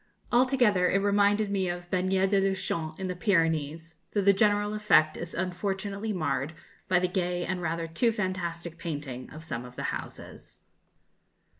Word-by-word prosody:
Altogether 240 -7 +4
it - - +3
reminded 205 +1 +2
me 190 -2 0
of 175 0 -5
Bagnères 185 +1 +2
de 200 -1 +4
Luchon, 170 -5 -1
in 190 - -2
the 180 - -3
Pyrenees, 165 -4 0 0.2
though 205 - +2
the 200 +1 +5
general 205 +1 +2
effect 170 -8 +4
is 170 0 -6
unfortunately 195 +3 -2
marred 155 -4 -1 0.3
by 185 -1 +3
the 180 +1 +2
gay 180 -1 -1
and 180 -1 -2
rather 165 0 -2
too 165 +9 +2
fantastic 175 -5 -3
painting 145 -6 -5
of 155 +1 -10
some 125 -7 -4
of 125 0 -11
the - - -5
houses. - - -8
180 Hz, 160 wpm, -28 LUFS, 165-200 Hz, 0.3 s, the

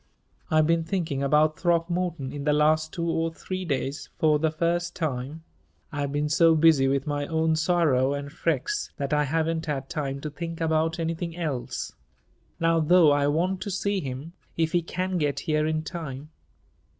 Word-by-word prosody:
"I've 155 -1 +4
been 165 +1 +2
thinking 160 -5 -2
about 150 +2 +3
Throckmorton 170 -4 0
in 145 -1 -5
the 150 0 +2
last 155 +1 +2
two 170 -1 -3
or 165 0 0
three 185 +3 -5
days 140 -1 -3
for 155 -1 +3
the 160 +1 +2
first 170 +2 -1
time. 150 -1 -3 0.5
I 145 -2 -3
have 140 -1 -2
been 145 +1 0
so 165 +2 +4
busy 155 -4 +5
with 135 0 0
my 145 -1 -2
own 160 0 +1
sorrow 155 -6 +2
and 140 0 -6
Freke's 415 - -1
that 140 +1 -2
I 150 0 +3
haven't 160 +2 -1
had 135 -2 -3
time 140 -3 -3
to 150 - -5
think 165 +2 -6
about 160 +1 +1
anything 165 0 -3
else. 150 -8 -3 0.7
Now, 165 0 +3
though, 160 0 +5
I 145 0 +2
want 180 +6 0
to 200 - -4
see 200 +1 -1
him 135 +4 -6 0.2
if 160 -1 +1
he 175 - +2
can 185 +2 -2
get 145 -2 0
here 155 0 0
in 155 0 -1
time." 155 -4 -7
160 Hz, 180 wpm, -26 LUFS, 145-170 Hz, 0.7 s, busy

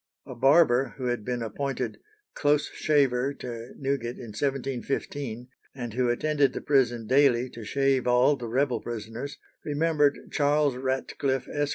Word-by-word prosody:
A - - -8
barber 135 -2 +4
who 130 - -4
had 120 -3 -1
been 120 +1 -2
appointed 125 +1 -3 0.3
"close 145 0 +1
shaver" 140 -2 +2
to 120 -2 -8
Newgate 135 -4 -2
in 120 - -9
1715, 135 -1 -3 0.3
and 120 -4 -5
who 125 0 +1
attended 145 +3 +2
the - - -4
prison 120 -5 +2
daily 130 0 +3
to 115 - -9
shave 135 +2 +1
all 125 +4 +4
the 120 -3 -6
rebel 130 +2 +1
prisoners, 120 +4 -6 0.3
remembered 150 -1 +1
Charles 145 -2 +2
Ratcliffe, 130 0 -2
Esq. 145 -1 -1
130 Hz, 145 wpm, -27 LUFS, 120-140 Hz, 0.3 s, barber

